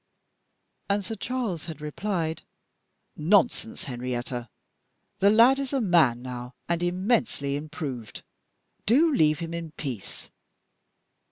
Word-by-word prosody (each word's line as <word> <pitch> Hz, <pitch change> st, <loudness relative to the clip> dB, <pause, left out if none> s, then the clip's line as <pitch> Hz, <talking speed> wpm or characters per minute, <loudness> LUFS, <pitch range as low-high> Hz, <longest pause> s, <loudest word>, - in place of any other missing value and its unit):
And 200 Hz, 0 st, +1 dB
Sir 225 Hz, -, -4 dB
Charles 225 Hz, -8 st, -3 dB
had 160 Hz, -, -6 dB
replied, 160 Hz, +1 st, -2 dB, 0.7 s
"Nonsense! 205 Hz, +6 st, +2 dB
Henrietta 125 Hz, -3 st, -4 dB, 0.7 s
the 200 Hz, -, +6 dB
lad 235 Hz, +6 st, +6 dB
is 275 Hz, 0 st, -3 dB
a 275 Hz, -, +2 dB
man 165 Hz, -, +3 dB
now, 125 Hz, 0 st, -7 dB
and 170 Hz, 0 st, 0 dB
immensely 180 Hz, -, +1 dB
improved; 145 Hz, -, -6 dB, 0.6 s
do 295 Hz, +8 st, +5 dB
leave 155 Hz, -, +4 dB
him 165 Hz, 0 st, -5 dB
in 165 Hz, -2 st, -5 dB
peace." 130 Hz, -11 st, -6 dB
165 Hz, 110 wpm, -27 LUFS, 140-210 Hz, 0.7 s, the